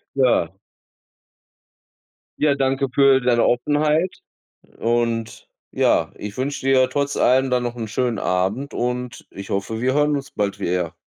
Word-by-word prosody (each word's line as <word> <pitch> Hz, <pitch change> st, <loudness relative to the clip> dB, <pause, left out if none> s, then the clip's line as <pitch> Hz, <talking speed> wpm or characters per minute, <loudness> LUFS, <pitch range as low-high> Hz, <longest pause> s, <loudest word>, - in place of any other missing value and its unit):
Ja. 125 Hz, -11 st, +2 dB, 1.9 s
Ja, 150 Hz, -2 st, +3 dB
danke 135 Hz, 0 st, 0 dB
für 135 Hz, -1 st, +5 dB
deine 125 Hz, -2 st, +2 dB
Offenheit. 150 Hz, +7 st, +1 dB, 0.6 s
Und 115 Hz, -1 st, -1 dB, 0.2 s
ja, -, -, +1 dB
ich 105 Hz, 0 st, -7 dB
wünsche 135 Hz, +1 st, -3 dB
dir 130 Hz, -1 st, +4 dB
trotz 140 Hz, 0 st, -2 dB
allem 130 Hz, +1 st, +3 dB
dann 125 Hz, -1 st, +1 dB
noch 120 Hz, 0 st, -4 dB
'n 115 Hz, -2 st, -5 dB
schönen 120 Hz, 0 st, -1 dB
Abend. 95 Hz, +10 st, -1 dB
Und 125 Hz, 0 st, -3 dB
ich 100 Hz, 0 st, -9 dB
hoffe, 100 Hz, +3 st, -2 dB
wir 130 Hz, +2 st, +1 dB
hören 150 Hz, 0 st, +2 dB
uns 140 Hz, -1 st, -6 dB
bald 100 Hz, -1 st, -2 dB
wie -, -, -2 dB
er. 90 Hz, -2 st, -1 dB
125 Hz, 145 wpm, -21 LUFS, 115-135 Hz, 1.9 s, für